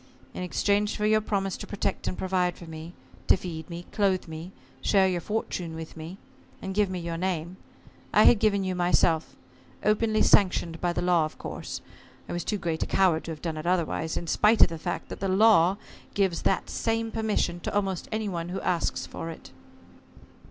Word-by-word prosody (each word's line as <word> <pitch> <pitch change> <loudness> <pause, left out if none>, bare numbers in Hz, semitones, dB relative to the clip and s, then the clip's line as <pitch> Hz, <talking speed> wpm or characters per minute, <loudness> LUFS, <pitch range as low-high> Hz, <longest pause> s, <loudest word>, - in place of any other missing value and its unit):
In - - -5
exchange 205 +3 +1
for 210 - 0
your 215 0 +4
promise 195 -3 -1
to - - -8
protect 205 - -2
and - - -2
provide 180 -1 0
for 170 - -10
me, 160 +1 -9 0.3
to - - +6
feed 160 -3 -7
me, 170 0 -7
clothe 195 -4 +1
me, 160 +3 -7 0.3
share 195 -2 +4
your 180 -2 -1
fortune 180 -5 -3
with 160 0 -8
me, 165 +4 -8 0.4
and 190 - -5
give 205 0 +2
me 185 - -3
your 170 -1 -4
name, 180 0 -2 0.5
I - - +6
had 235 - +7
given 200 -2 +2
you 185 -1 -1
myself, 175 -2 +2 0.5
openly 215 +1 +2
sanctioned 175 -4 +3
by 175 - +1
the 175 - -2
law, 175 -3 +3
of 155 - -8
course - - -6 0.5
I - - -5
was 175 -1 -2
too 210 - -1
great 165 -4 -2
a - - 0
coward 180 -4 +2
to 165 - -4
have 155 - -8
done 165 -2 -2
it 155 +2 -5
otherwise, 170 -2 0
in - - -4
spite 210 +7 +5
of - - +6
the 165 -1 -6
fact - - -4
that - - -7
the 195 - -1
law 195 -2 +5 0.4
gives 190 -4 +1
that 195 - +1
same 225 0 -1
permission 215 -6 0
to - - -4
almost 195 -3 -1
any 220 -1 -1
one 170 -3 -3
who 185 - -3
asks 175 -2 0
for 165 - -6
it." 165 - -10
180 Hz, 200 wpm, -27 LUFS, 170-200 Hz, 0.5 s, had